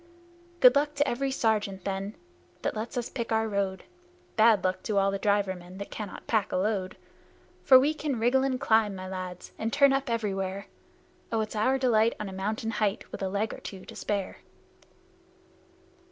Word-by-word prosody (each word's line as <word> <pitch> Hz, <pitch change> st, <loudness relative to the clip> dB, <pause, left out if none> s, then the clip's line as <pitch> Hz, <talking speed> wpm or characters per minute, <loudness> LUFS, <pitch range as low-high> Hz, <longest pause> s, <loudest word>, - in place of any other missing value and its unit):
Good 250 Hz, +1 st, +8 dB
luck 295 Hz, +1 st, +1 dB
to 290 Hz, 0 st, +2 dB
every 270 Hz, +3 st, -1 dB
sergeant, 210 Hz, -7 st, 0 dB
then, 195 Hz, +1 st, -3 dB, 0.5 s
that -, -, -1 dB
lets 220 Hz, +3 st, -4 dB
us 240 Hz, -, -1 dB
pick 235 Hz, -3 st, -5 dB
our 220 Hz, 0 st, +2 dB
road; 195 Hz, -3 st, -2 dB, 0.5 s
Bad 220 Hz, -3 st, +5 dB
luck 185 Hz, 0 st, 0 dB
to 210 Hz, -, -2 dB
all 195 Hz, 0 st, +3 dB
the 195 Hz, -, -3 dB
driver 200 Hz, -1 st, +2 dB
men 180 Hz, +1 st, -11 dB
that 200 Hz, -, -7 dB
cannot 210 Hz, -3 st, -7 dB
pack 220 Hz, -4 st, 0 dB
a -, -, -1 dB
load: 190 Hz, -1 st, -1 dB, 0.6 s
For 260 Hz, -1 st, +8 dB
we 290 Hz, +4 st, +2 dB
can 300 Hz, -4 st, -2 dB
wriggle 245 Hz, +4 st, +3 dB
and 260 Hz, -2 st, 0 dB
climb, 220 Hz, -6 st, +3 dB
my 185 Hz, 0 st, -7 dB
lads, 185 Hz, -1 st, -6 dB
and 225 Hz, +1 st, -1 dB
turn 280 Hz, +1 st, +5 dB
up 270 Hz, -1 st, -1 dB
everywhere, 200 Hz, -3 st, -2 dB, 0.7 s
Oh, 225 Hz, -1 st, +1 dB
it's 215 Hz, 0 st, -4 dB
our 255 Hz, +6 st, +2 dB
delight 230 Hz, -3 st, +3 dB
on 210 Hz, -, -4 dB
a 190 Hz, -, -7 dB
mountain 215 Hz, +4 st, -2 dB
height, 210 Hz, -2 st, -1 dB
with -, -, -7 dB
a 190 Hz, -, -1 dB
leg 205 Hz, +3 st, -1 dB
or -, -, -8 dB
two 190 Hz, -2 st, -9 dB
to -, -, -11 dB
spare! 200 Hz, -2 st, -3 dB
215 Hz, 190 wpm, -28 LUFS, 195-240 Hz, 0.7 s, Good